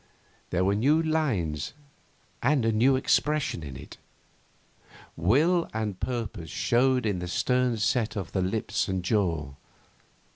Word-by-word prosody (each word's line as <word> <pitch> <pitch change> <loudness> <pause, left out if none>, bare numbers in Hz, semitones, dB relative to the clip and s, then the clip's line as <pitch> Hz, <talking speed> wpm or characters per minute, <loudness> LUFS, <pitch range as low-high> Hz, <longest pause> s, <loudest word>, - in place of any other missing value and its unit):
There 90 +1 +1
were 100 - +3
new 140 +10 +3
lines 130 - -1 0.7
and 135 -2 +2
a 115 - +3
new 125 +5 +4
expression 150 - +1
in 70 -4 -8
it. 70 - -11 1.2
Will 150 - +2
and 105 -4 -3
purpose 115 -9 -4
showed 125 +1 +2
in 100 -4 0
the 90 - -4
stern 125 +5 +1
set 110 +1 0
of 95 -6 -4
the 95 - 0
lips 95 +4 -1
and 95 -2 -2
jaw. 85 - 0
110 Hz, 135 wpm, -27 LUFS, 90-130 Hz, 1.2 s, new